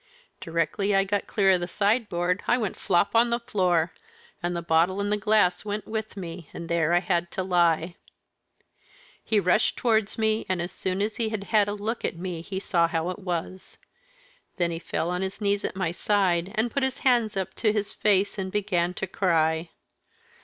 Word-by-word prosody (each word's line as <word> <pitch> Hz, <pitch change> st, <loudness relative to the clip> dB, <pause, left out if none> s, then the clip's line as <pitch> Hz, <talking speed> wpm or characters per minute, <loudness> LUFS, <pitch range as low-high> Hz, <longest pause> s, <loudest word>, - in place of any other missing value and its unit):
Directly 170 Hz, +5 st, 0 dB
I 195 Hz, -, +4 dB
got 200 Hz, +1 st, -2 dB
clear 195 Hz, -2 st, +3 dB
of 185 Hz, -, +3 dB
the 175 Hz, -, -3 dB
sideboard 200 Hz, -4 st, 0 dB
I -, -, +4 dB
went 215 Hz, -6 st, -2 dB
flop 175 Hz, +1 st, +1 dB
on 235 Hz, +1 st, +5 dB
the 235 Hz, 0 st, 0 dB
floor, 180 Hz, -8 st, +1 dB, 0.5 s
and 175 Hz, 0 st, -2 dB
the 170 Hz, -, -3 dB
bottle 170 Hz, +4 st, +2 dB
and 205 Hz, 0 st, -1 dB
the -, -, +3 dB
glass 205 Hz, -4 st, +2 dB
went 210 Hz, 0 st, -4 dB
with 220 Hz, -1 st, -5 dB
me, 170 Hz, -3 st, -7 dB
and 170 Hz, -, -6 dB
there 170 Hz, -1 st, +1 dB
I 175 Hz, -, +5 dB
had 175 Hz, -2 st, 0 dB
to 190 Hz, -, -2 dB
lie. 170 Hz, -2 st, +2 dB, 1.3 s
He 220 Hz, -2 st, +2 dB
rushed 185 Hz, +3 st, +2 dB
towards 220 Hz, -4 st, +1 dB
me, 220 Hz, 0 st, +1 dB
and 185 Hz, -1 st, 0 dB
as 175 Hz, +1 st, -3 dB
soon 190 Hz, +1 st, -2 dB
as 215 Hz, +1 st, -3 dB
he 225 Hz, -2 st, 0 dB
had 215 Hz, -2 st, -3 dB
had 210 Hz, -1 st, +2 dB
a 205 Hz, -, -2 dB
look 215 Hz, +3 st, -4 dB
at -, -, -1 dB
me 175 Hz, -2 st, -5 dB
he 190 Hz, +3 st, -5 dB
saw 170 Hz, -3 st, +2 dB
how 165 Hz, +1 st, -1 dB
it 185 Hz, -, -7 dB
was. 180 Hz, 0 st, -5 dB, 0.8 s
Then 175 Hz, -1 st, +1 dB
he 165 Hz, -, -4 dB
fell 170 Hz, 0 st, -2 dB
on 180 Hz, +1 st, -2 dB
his 190 Hz, +2 st, -4 dB
knees 200 Hz, -1 st, 0 dB
at -, -, -3 dB
my 190 Hz, -4 st, -1 dB
side, 185 Hz, -1 st, +1 dB
and 230 Hz, +2 st, 0 dB
put 280 Hz, -, -1 dB
his 265 Hz, -1 st, -1 dB
hands 235 Hz, -5 st, +3 dB
up 190 Hz, 0 st, -3 dB
to 215 Hz, -, +2 dB
his 210 Hz, -1 st, -2 dB
face, 205 Hz, 0 st, +1 dB
and 190 Hz, -1 st, -3 dB
began 185 Hz, -4 st, 0 dB
to 190 Hz, -, -3 dB
cry. 165 Hz, -3 st, +1 dB
190 Hz, 205 wpm, -26 LUFS, 175-210 Hz, 1.3 s, on